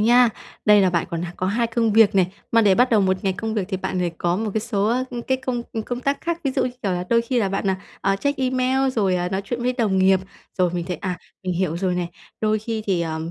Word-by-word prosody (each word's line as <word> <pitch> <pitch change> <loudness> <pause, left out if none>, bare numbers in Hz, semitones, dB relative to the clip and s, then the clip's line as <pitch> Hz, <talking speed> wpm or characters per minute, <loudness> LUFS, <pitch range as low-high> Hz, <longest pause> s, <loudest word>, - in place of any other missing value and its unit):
nha. 240 +2 +6 0.4
Đây 210 -1 +6
là 185 -2 +3
bạn 170 -2 0
còn 170 0 -3
h 175 - -3
có 185 - -1
hai 230 +4 +1
công 225 -1 +1
việc 215 -2 +5
nè. 190 -2 +5 0.3
Mà 230 - +6
để 200 -3 +5
bắt 250 +3 +3
đầu 220 - +5
một 190 -1 +2
ngày 190 - +2
công 220 +3 -4
việc 205 -4 0
thì 190 - -1
bạn 185 0 -3
phải 175 -1 0
có 175 0 +1
một 215 +1 -2
cái 220 - +1
số, 210 -3 -1
a, 255 +2 +1
ơ, 240 -1 -4
cái 260 - +2
công, 255 -2 -3
ừ, 225 - -2
công 245 +2 -4
tác 275 +2 -1
khác. 340 0 -2
Ví 275 - +1
dụ, - - 0
như 250 - -1
kiểu 195 -3 0
là, 180 0 -2
đôi 230 0 +4
khi 245 +1 0
là 200 -4 +1
bạn, 195 0 0
à, 190 - 0 0.2
à, 195 0 +1
check 285 +5 -1
email 260 +1 +1
rồi, 195 -7 +1
à, 180 0 -1
nói 190 +1 -1
chuyện 240 +3 -3
với 250 - +1
đồng 215 -6 +1
nghiệp, 190 0 +4 0.4
rồi 180 -2 +3
mình 170 -1 -2
thấy 180 -2 -3
à, 180 +1 -3 0.3
mình 180 -1 -1
hiểu 170 -2 0
rồi 180 0 0
này. 175 -1 -2 0.3
Đôi 215 0 +2
khi 220 0 -4
thì, 190 -4 +1
ờm, 160 0 -3
210 Hz, 300 wpm, -22 LUFS, 185-240 Hz, 0.4 s, nha